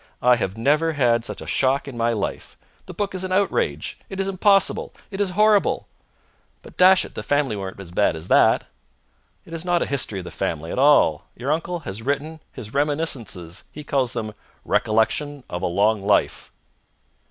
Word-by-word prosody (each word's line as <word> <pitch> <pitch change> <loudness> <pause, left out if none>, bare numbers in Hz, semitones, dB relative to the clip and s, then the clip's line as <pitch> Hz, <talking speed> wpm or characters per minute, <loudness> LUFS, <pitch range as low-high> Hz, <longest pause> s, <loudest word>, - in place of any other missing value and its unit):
I 125 0 +6
have 100 -2 -3
never 150 +7 +2
had 120 -5 +2
such - - -5
a - - -7
shock 135 +1 +1
in 135 - -7
my 115 0 +1
life. 105 -4 -4 0.3
The - - -8
book 205 -1 -2
is 185 0 -2
an 185 - -4
outrage. 195 +1 0
It 195 - -6
is 195 - 0
impossible. 195 +1 +2 0.2
It 195 +1 -3
is 200 - +2
horrible!" 210 -1 +3 0.8
"But, - - -14
dash 185 +1 +6
it, - - -12
the - - -5
family 145 -5 0
weren't 95 -1 -6
so 95 -3 -10
bad 100 -3 +2
as 80 +1 -7
all - - +7
that." - - +4 0.8
"It 165 - -12
is 165 0 -4
not 175 -1 +1
a - - -2
history 135 -7 -2
of - - -7
the - - -8
family 80 +3 -3
at - - -2
all. 135 - +4
Your 130 +4 -3
uncle 165 +2 -2
has 110 -6 -6
written 145 +5 -3
his 105 0 -8
reminiscences! 140 - -1
He 150 - -9
calls 130 -4 0
them 110 -3 -4 0.3
'Recollections 125 +6 0
of 90 - -4
a 95 - 0
Long 100 +4 +2
Life'!" 100 +1 +1
135 Hz, 195 wpm, -22 LUFS, 110-165 Hz, 0.8 s, all